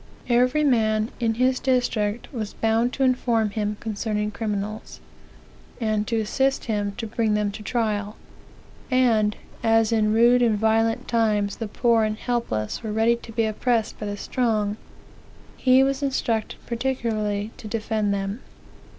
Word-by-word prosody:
Every 250 +5 +3
man, 220 -5 +2
in 225 -2 +1
his 255 +2 +2
district, 245 -4 0
was 215 -4 -5
bound 225 +2 +1
to 275 - 0
inform 235 -4 +2
him 210 0 -2
concerning 210 -1 -2
criminals, 215 0 -4 0.8
and 215 -2 0
to 230 - 0
assist 265 +5 0
him 205 -3 -1
to 235 - -4
bring 220 -1 0
them 210 -1 0
to 210 - -9
trial; 210 -1 -1 0.7
and, 230 -5 +3 0.3
as 225 -1 +3
in 215 -2 +2
rude 240 +3 +5
and 225 -3 +3
violent 225 +1 +1
times 215 -3 +1
the 225 - -4
poor 230 +1 +2
and 215 0 -1
helpless 225 - -2
were 220 -2 -4
ready 225 +2 +3
to 235 - -12
be 225 0 +1
oppressed 225 +1 -1
by 210 - -4
the 205 0 -4
strong, 215 -3 0 0.8
he 260 0 +4
was 275 +1 0
instructed 235 -5 -1
particularly 225 -4 -2
to 220 - -9
defend 215 -1 -1
them. 200 +2 -2
225 Hz, 150 wpm, -24 LUFS, 210-240 Hz, 0.8 s, rude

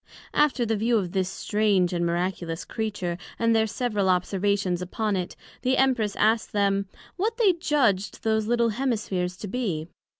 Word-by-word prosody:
After 290 -5 +2
the 225 0 0
view 225 +3 +2
of 185 -5 -2
this 185 -1 0
strange 200 -5 +1
and 175 -1 0
miraculous 170 -1 -2
Creature, 200 -6 -3 0.2
and 230 0 +2
their 220 0 +3
several 215 -3 -1
observations 185 0 +1
upon 210 +3 -1
it, 180 -2 -3 0.3
the 260 +1 +1
Empress 245 -6 +2
asked 220 +1 +2
them, 200 -1 +1 0.3
What 440 +5 -1
they 420 -6 +5
judged 260 - 0
those 220 -1 +1
little 235 0 +2
Hemispheres 210 -7 -2
might 205 - -5
be? 185 -11 -2
210 Hz, 160 wpm, -26 LUFS, 185-235 Hz, 0.3 s, they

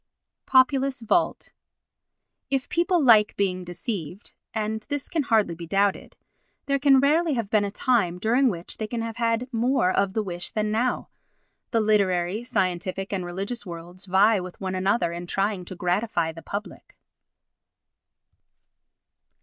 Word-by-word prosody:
Populus 265 0 +3
Vult 330 +10 0 1.0
If 270 -2 -1
people 350 +1 +2
like 220 -5 +5
being 185 -2 0
deceived—and 210 +4 -5
this 290 -2 -2
can 325 - 0
hardly 220 -9 +2
be 170 0 -8
doubted—there 200 - -2
can 275 -1 +5
rarely 305 +3 +2
have 225 -4 -3
been 215 -2 +3
a 200 - -1
time 205 -5 +1
during 245 +7 +3
which 175 -4 -5
they 215 - -3
can 230 +1 -3
have 225 -1 -5
had 230 +1 0
more 240 -3 +2
of 195 0 +1
the 220 - 0
wish 175 -2 -3
than 215 -1 -1
now. 240 +3 0 0.6
The 230 -2 +1
literary, 200 -1 +1
scientific 190 -4 -2
and 190 -2 -1
religious 195 +7 -4
worlds 175 0 -9
vie 200 +3 +4
with 180 -1 -8
one 190 -1 -3
another 190 0 +1
in 175 +1 -6
trying 195 0 -1
to 185 - -8
gratify 180 -2 0
the 165 +1 -11
public. 205 +4 -7
210 Hz, 140 wpm, -25 LUFS, 185-240 Hz, 1.0 s, like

